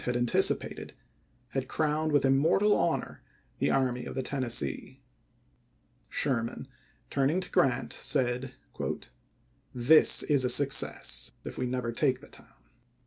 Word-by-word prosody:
281. 125 - -2
had - - 0
anticipated, - - 0 0.6
had 130 0 -3
crowned 155 +2 -1
with 145 -2 +2
immortal 160 +10 +3
honor 170 - -2 0.4
the - - +1
Army 125 -2 0
of - - -7
the 130 - -2
Tennessee. 125 - -2 1.1
Sherman, 120 -1 -2 0.4
turning 140 +6 +1
to 185 - -8
Grant, 135 -2 +1
said: 125 +1 0 0.6
" - - -37
This 125 +6 +5
is 145 -4 +2
a 125 - +1
success, 125 - +3
if - - -8
we 125 - -1
never 125 -1 -3
take 130 +1 0
the 145 - -15
town." - - -18
130 Hz, 135 wpm, -28 LUFS, 125-145 Hz, 1.1 s, This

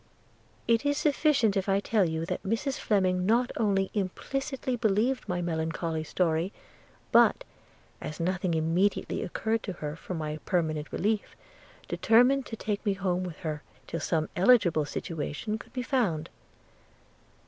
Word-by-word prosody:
It 230 +2 +3
is 285 0 +1
sufficient 285 -8 +3
if 195 0 0
I 195 0 +3
tell 200 -3 +2
you 160 0 -2
that - - -3
Mrs 230 +7 -1
Fleming 185 -4 +2
not 235 +6 +2
only 195 -3 +1
implicitly 260 +7 -2
believed 225 +3 +1
my 175 -1 -1
melancholy 160 -1 -2
story, 165 +2 0 0.6
but, - - +5 0.6
as 155 - -6
nothing 180 0 0
immediately 165 +5 +1
occurred 220 +5 -1
to 195 - -5
her 150 -3 -5
for 180 - -6
my 155 -1 -3
permanent 155 -4 -1
relief, 215 +1 -1 0.5
determined 250 +4 +4
to 225 - -5
take 210 -2 -3
me 205 -3 +2
home 185 -2 -1
with 175 -4 -7
her, 155 -3 -3 0.2
till 165 - -4
some 155 0 0
eligible 180 -6 +4
situation 165 +8 -4
could - - -13
be 250 - -3
found. 195 - 0
190 Hz, 145 wpm, -28 LUFS, 165-225 Hz, 0.6 s, but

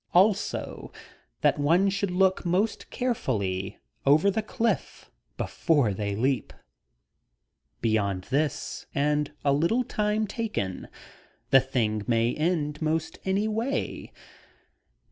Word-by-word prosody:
Also, 195 +3 +1 0.5
that - - +3
one 170 +7 +4
should 200 0 0
look 190 +1 +2
most 185 +5 0
carefully 100 - -2 0.3
over 155 +8 +5
the 220 - 0
cliff 225 +2 -2 0.3
before 140 -10 +1
they 100 0 -2
leap. 130 +4 0 1.3
Beyond 100 -5 +1
this, 145 +1 -1
and 150 +1 +1
a 140 - +4
little 170 - +2
time 210 -1 0
taken, 205 - -3 0.6
the 135 - +8
thing 115 -5 0
may 115 0 +2
end 150 -2 -1
most 160 +1 -1
any 195 +3 +1
way. 225 +5 -2
155 Hz, 105 wpm, -27 LUFS, 125-200 Hz, 1.3 s, the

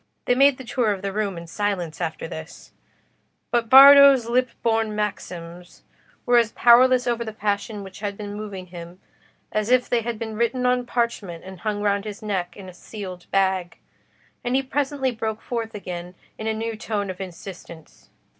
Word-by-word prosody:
They - - +3
made 275 +1 +4
the 260 - -9
tour 235 -2 0
of 195 -1 -4
the 195 -1 -3
room 205 -3 -2
in 170 - -8
silence 180 -3 -3
after 165 -1 -3
this; 160 0 -10 0.8
but 235 -2 0
Bardo's 275 -1 +9
lip 250 +2 +1
born 225 -2 +1
maxims 180 -4 -6 0.4
were 245 -1 +5
as 230 -1 0
powerless 250 +1 +5
over 240 -1 0
the 220 - -6
passion 205 0 -3
which 190 -1 -11
had 200 -1 -4
been 205 -1 -6
moving 205 -3 -7
him, 175 +1 -10 0.5
as 215 +1 -1
if 250 0 +3
they 240 -1 +1
had 235 0 -4
been 220 0 -5
written 235 +3 0
on 250 0 +1
parchment 230 -9 -2
and 190 -1 -10
hung 205 +1 -3
round 200 0 +1
his 210 0 -7
neck 185 -4 -3
in 195 -2 -10
a 185 - -10
sealed 185 -2 -9
bag; 190 -3 0 0.7
and 245 +1 -1
he 270 - +2
presently 270 -1 -1
broke 220 -2 -4
forth 230 -2 -4
again 180 -2 -7 0.2
in 220 - -6
a 220 - +1
new 225 +1 -3
tone 210 -2 -3
of 185 - -9
insistence. 175 -3 -11
215 Hz, 185 wpm, -23 LUFS, 190-235 Hz, 0.8 s, Bardo's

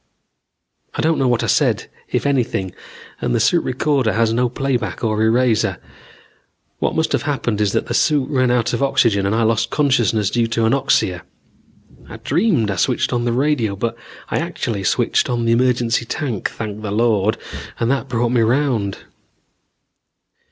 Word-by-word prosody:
I - - -1
don't 160 0 +2
know 135 - +2
what 120 -2 +1
I - - 0
said, - - +1 0.2
if - - -1
anything, 120 -9 0 0.5
and - - 0
the - - +2
suit 140 +10 +2
recorder 130 -2 0
has 115 0 +1
no 125 +1 +1
playback 125 -6 -2
or 110 -1 0
eraser. 115 0 +2 1.0
What - - -1
must 160 0 0
have - - +1
happened 120 -7 -2
is 105 -2 +2
that - - 0
the - - -4
suit 145 -4 +2
ran 130 -3 +2
out 120 -1 +1
of - - -1
oxygen, 110 -7 +2
and 100 - 0
I 115 - +2
lost 115 +1 +1
consciousness 115 -8 +1
due 120 -1 +1
to 115 0 -1
anoxia. 115 -7 +1 0.9
I - - -8
dreamed 140 - +1
I 95 - -3
switched 125 +7 0
on 120 0 0
the 120 - +1
radio, 125 -6 0
but 115 +4 -3 0.3
I - - 0
actually 100 -4 -3
switched - - +1
on 120 -1 -1
the 115 - +2
emergency 120 -1 +1
tank, 130 - -3
thank 110 -1 -6
the 105 - -4
Lord, 110 -1 +1 0.4
and 115 +2 +1
that 135 -1 -2
brought 120 -1 0
me 120 -2 +2
round. 115 -4 +1
120 Hz, 175 wpm, -19 LUFS, 110-130 Hz, 1.0 s, don't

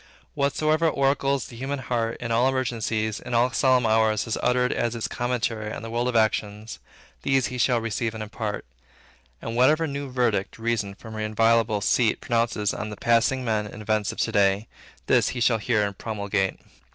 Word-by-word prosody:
Whatsoever 155 +3 +1
oracles 140 -2 +1
the 120 - -11
human 135 +4 -3
heart, 120 -3 -2
in 115 -1 -4
all 120 +3 +3
emergencies, 115 -4 -1
in 120 - -4
all 120 +2 +3
solemn 130 -2 +3
hours, 110 -1 +3
has 115 - -2
uttered 125 0 +2
as 120 0 -1
its 115 - -2
commentary 120 -3 -2
on - - -6
the 115 - -6
world 120 +1 0
of 125 - -2
actions, 105 0 0 0.4
these 135 -2 +2
he 125 - -4
shall 120 -1 +3
receive 115 0 -2
and 110 - -4
impart. 105 0 -5 0.8
And 115 - -4
whatsoever 150 +7 +4
new 140 -2 -4
verdict 120 -6 0
Reason 115 -4 -2
from 110 +2 -11
her 110 - -5
inviolable 110 0 +2
seat 115 +2 +2
pronounces 115 -4 0
on 105 - -4
the 105 - -7
passing 120 +2 +2
men 110 -2 0
and 105 +1 -9
events 105 -1 0
of - - -11
to - - 0
day, 100 +1 +2 0.4
this - - +3
he - - -1
shall 115 -1 +3
hear 105 -1 +1
and 100 -1 -4
promulgate. 100 -3 -2
115 Hz, 190 wpm, -25 LUFS, 110-125 Hz, 0.8 s, whatsoever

